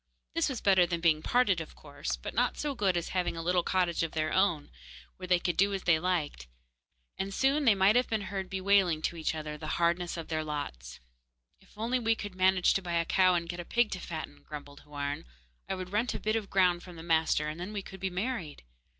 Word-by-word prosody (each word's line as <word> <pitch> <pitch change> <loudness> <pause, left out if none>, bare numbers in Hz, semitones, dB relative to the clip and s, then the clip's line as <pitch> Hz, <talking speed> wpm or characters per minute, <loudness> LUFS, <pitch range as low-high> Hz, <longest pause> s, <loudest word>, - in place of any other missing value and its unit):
This 330 -2 +1
was 255 -4 -4
better 190 -3 +5
than 170 -1 -2
being 160 -2 +3
parted, 200 -5 +2
of 160 - -9
course, 145 - -5
but - - -7
not - - +1
so 295 -1 -2
good 195 -8 +1
as 170 - -3
having 180 -2 -1
a - - -3
little 180 +1 +2
cottage 175 -1 +1
of 165 -1 -2
their 155 -1 -1
own, 175 -6 +1 0.5
where 185 - -7
they 180 0 +4
could 175 0 -1
do 200 +1 +3
as 190 - -5
they 165 -3 +4
liked, 160 - -2 0.7
and 195 +1 -2
soon 275 +7 +2
they 225 -4 +6
might 195 +3 +4
have 250 +1 +3
been 220 -2 0
heard 190 -1 -4
bewailing 190 -4 +2
to - - -1
each 160 -1 -2
other 150 -1 -5
the 155 0 -3
hardness 170 +1 +1
of 165 - -6
their 155 -1 -1
lots. 65 - -6 0.6
'If - - -23
we 225 0 +1
could 205 -2 -6
only 185 - -18
manage 185 -1 +4
to 195 - 0
buy 175 -2 -4
a 170 0 +1
cow 185 +1 +4
and 170 -1 -1
get 175 +1 -5
a - - -3
pig 235 +5 +1
to 185 - -3
fatten,' 155 -4 -7
grumbled 145 -1 -9
Houarn, 145 -1 -4 0.5
'I 190 - 0
would 185 -1 -6
rent 215 +2 0
a - - -3
bit 215 +1 0
of 215 -3 -2
ground 180 -2 +3
from 180 -1 -11
the 165 - -9
master, 160 -2 +2
and 155 +2 -5
then 180 +4 -5
we 205 -2 -4
could 190 - -10
be 190 +1 -1
married. 185 - -4
180 Hz, 240 wpm, -30 LUFS, 160-195 Hz, 0.7 s, they